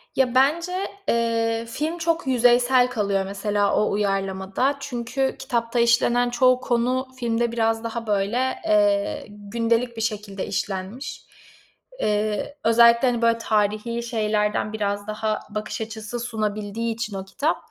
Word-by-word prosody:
Ya, 255 -2 +2
bence, 340 +8 +2 0.2
eee, 230 0 +1
film 310 +7 -2
çok 335 -2 -1
yüzeysel 245 0 +4
kalıyor, 200 -5 0
mesela, 200 +1 0
o 210 - +2
uyarlamada 195 +5 0
çünkü 265 +1 -2
kitapta 235 0 -1
işlenen 235 +1 +3
çoğu 255 +1 +3
konu 255 +2 0
filmde 235 -1 0
biraz 225 -1 0
daha, 230 0 -4
böyle, 215 +6 0
eee, 205 -1 +2
gündelik 230 +3 -1
bir - - -3
şekilde 210 -3 -3
işlenmiş. 195 +5 -4 0.7
Eee, 210 - -1
özellikle, 235 +2 +6
hani, 240 -1 0
böyle, 230 0 +3
tarihî 215 +1 0
şeylerden 215 -2 0
biraz 205 -1 -2
daha 215 0 -1
bakış 215 +1 -4
açısı 220 +1 -5
sunabildiği 220 -1 -2
için 220 -3 -5
o 190 - -6
kitap, 290 +11 -1
230 Hz, 130 wpm, -23 LUFS, 210-245 Hz, 0.7 s, özellikle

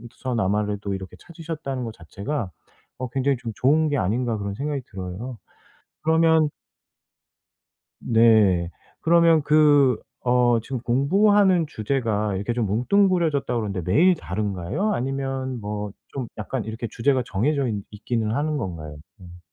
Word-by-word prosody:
서나마라도 105 -4 -1
이렇게 95 -1 -7
찾으셨다는 155 -6 -6
거 115 - -5
자체가 100 - -5 0.5
어 130 -1 -4
굉장히 135 0 0
좀 115 -1 -6
좋은 155 +4 +3
게 145 - 0
아닌가 115 +3 0
그런 100 -1 -4
생각이 140 +1 -3
들어요. 95 +6 -6 0.7
그러면 160 -1 +4 1.5
네. 110 -7 +4 0.3
그러면 165 -1 +5
그 145 -4 +5 0.3
어 120 -1 +4
지금 130 +1 -4
공부하는 180 - +3
주제가 110 -5 -1
이렇게 100 +5 -2
좀 115 -2 0
뭉뚱그려졌다고 145 - +1
그러는데 100 -3 -3
매일 175 - +5
다른가요? 100 - -2
아니면 135 -2 -3
뭐 105 0 -4 0.2
좀 130 -4 -5
약간 115 +3 -3
이렇게 110 +1 -5
주제가 130 +1 +1
정해져 135 +7 0
있 105 -3 -3
있기는 110 +1 -2
하는 150 +3 0
건가요? 80 - -6 0.2
음. 90 -1 -12
125 Hz, 310 characters per minute, -24 LUFS, 105-145 Hz, 1.5 s, 그러면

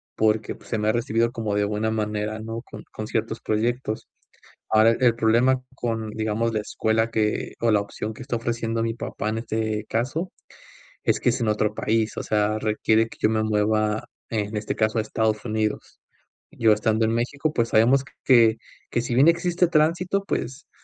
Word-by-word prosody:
porque, 110 0 +1
pues, - - -17
se 115 - -1
me 105 0 +1
ha - - +5
recibido 115 0 +1
como 110 -4 -2
de 105 - +2
buena 105 +2 -1
manera, 105 0 -2
¿no?, 115 +1 -5
con - - -11
con - - -6
ciertos - - -2
proyectos. 110 +1 -2 0.6
Ahora, 110 +1 +6
el 120 -1 +2
problema 120 +3 +3
con, 115 -4 -3
digamos, 110 +1 -1
la 105 - +1
escuela 110 +2 0
que 110 -1 -1
o 115 -1 +3
la 105 - +4
opción 105 +2 -5
que - - -10
está 120 -1 -2
ofreciendo 115 -1 -2
mi 115 - -1
papá 110 -2 -4
en 110 - -2
este 110 -2 -2
caso 135 +11 -1 0.7
es - - +2
que 125 - +2
es 125 +1 -2
en 115 - 0
otro 105 0 +1
país, 110 0 0
o - - -3
sea, 105 0 0
requiere 110 +1 +2
que - - -14
yo 110 - +3
me 110 -1 +1
mueva, 110 0 +1 0.2
en 105 -1 -2
este 105 - -3
caso, 110 +1 +1
a - - +2
Estados 110 -1 -1
Unidos. 110 -2 -2 0.5
Yo 110 -1 +3
estando 110 +1 +1
en 115 - 0
México, 140 +6 -1
pues, 115 -4 0
sabemos 130 +5 +4 0.2
que 115 -3 +6 0.3
que, 120 - +1
si 120 - -2
bien 135 +5 +6
existe 175 +1 +3
tránsito, 175 +5 +1
pues, 130 -4 -4
110 Hz, 190 wpm, -24 LUFS, 110-120 Hz, 0.7 s, Ahora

